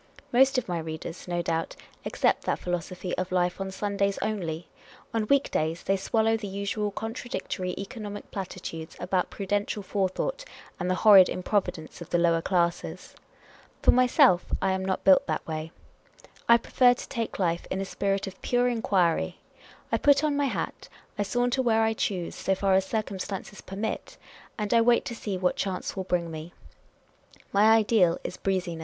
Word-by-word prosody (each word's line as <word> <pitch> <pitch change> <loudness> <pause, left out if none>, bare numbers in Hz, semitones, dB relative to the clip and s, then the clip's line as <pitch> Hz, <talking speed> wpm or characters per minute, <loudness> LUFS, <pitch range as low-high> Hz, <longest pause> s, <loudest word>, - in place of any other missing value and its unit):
Most 265 +2 +5
of 255 - -1
my 175 -2 -2
readers, 160 +2 -7
no 175 -1 -1
doubt, 165 -1 -2 0.3
accept - - +1
that - - 0
philo 175 0 -1
sophy 180 +2 -5
of 185 0 -3
life 180 +1 0
on 195 - -3
Sundays 200 0 -1
only; 170 -6 -3 0.5
on 220 -2 0
week 280 +2 +2
days 160 +2 -1
they 195 - +2
swallow 225 +3 +1
the 220 -2 -4
usual 200 +2 -2
contradictory 215 -4 -4
economic 205 0 -7
platitudes 180 -4 -6
about 180 0 0
prudential 205 +1 -2
forethought 205 - -1 0.4
and 180 0 -1
the 185 - +2
horrid 195 -4 +9
improvidence 180 -4 -2
of 170 - -8
the 175 - +2
lower 170 -1 +3
classes. 170 -1 -1 0.7
For - - +7
myself, 245 -8 +5
I 190 - +1
am 190 0 -1
not 190 -1 -2
built 190 -1 +5
that 155 - -2
way. 160 0 -5 0.8
I 235 - +9
prefer 245 +1 +4
to - - -8
take 230 -1 -3
life 170 -3 0
in 190 - -2
a 195 - -2
spirit 195 0 -1
of 190 -1 -9
pure 245 0 +2
enquiry. 195 -8 +1 0.5
I - - +2
put 285 0 +4
on 300 -2 +1
my 285 0 +1
hat; 265 - -4 0.3
I - - +3
saunter 245 +5 +1
where 225 -3 +3
I 220 0 +2
choose, 185 -5 -2
so 190 - 0
far 195 0 +1
as 190 0 +3
circumstances 200 -1 -4
permit; 205 +3 -5 0.4
and 210 -1 -1
I 230 - +6
wait 235 +1 +4
to 235 - -4
see 205 -4 -4
what 180 0 +1
chance 190 -2 -3
will 190 -1 -3
bring 175 -2 -1
me. 160 +2 -8 1.0
My 200 +1 +5
ideal 210 -6 +3
is - - -5
breeziness. 185 -4 -2
195 Hz, 175 wpm, -27 LUFS, 180-220 Hz, 1.0 s, horrid